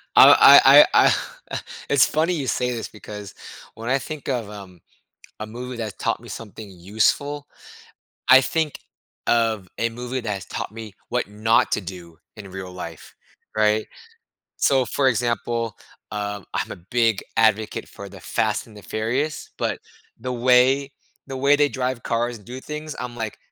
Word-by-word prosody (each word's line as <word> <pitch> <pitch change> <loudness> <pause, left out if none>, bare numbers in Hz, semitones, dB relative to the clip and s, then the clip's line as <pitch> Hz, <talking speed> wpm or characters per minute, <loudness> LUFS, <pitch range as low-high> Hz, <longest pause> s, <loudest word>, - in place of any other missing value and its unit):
Uh, - - +10
I - - +9
I - - +6
I - - +5 0.4
Eh, - - -1 0.3
it's 140 -1 +5
funny 160 +4 +1
you 150 -6 -2
say 125 0 0
this 115 -2 -4
because 105 -2 -9 0.4
when 115 +2 -6
I 130 - +3
think 150 +1 -7
of, 120 -6 -2
um, 95 -4 -11 0.6
a 110 - -5
movie 125 +3 -7
that 110 -3 -5
taught 115 - -1
me 120 - -12
something 105 0 -9
useful, 110 +11 -1 0.8
I 130 +1 +9
think 155 +2 -1 0.5
of 110 -6 +1
a 115 - 0
movie 125 +2 -5
that's 100 -6 -4
taught - - -5
me 110 -2 -9 0.2
what - - -1
not 110 +2 +2
to - - 0
do 85 -3 -10 0.2
in 100 -3 -10
real 95 0 -7
life, 85 -3 -9 0.4
right? 110 0 +2 0.7
So, 135 -2 +3
for 135 - 0
example, 115 -2 -1 0.3
um, 105 -1 -4
I'm - - -2
a 85 - -11
big 115 -4 +2
advocate 110 -1 +2
for - - -10
The - - -12
Fast - - -1
and 110 - -16
the 105 - -12
Furious, 120 - -2
but - - -2 0.4
the 125 - -4
way 130 +3 +3 0.4
the 135 -1 -6
way 140 +2 +4
they 145 0 +3
drive 130 -3 -3
cars 120 0 -1
and 105 - -20
do 125 +2 -7
things, 150 +2 -7
I'm 125 -1 -5
like, 110 -2 -5
115 Hz, 170 wpm, -23 LUFS, 105-130 Hz, 0.8 s, Uh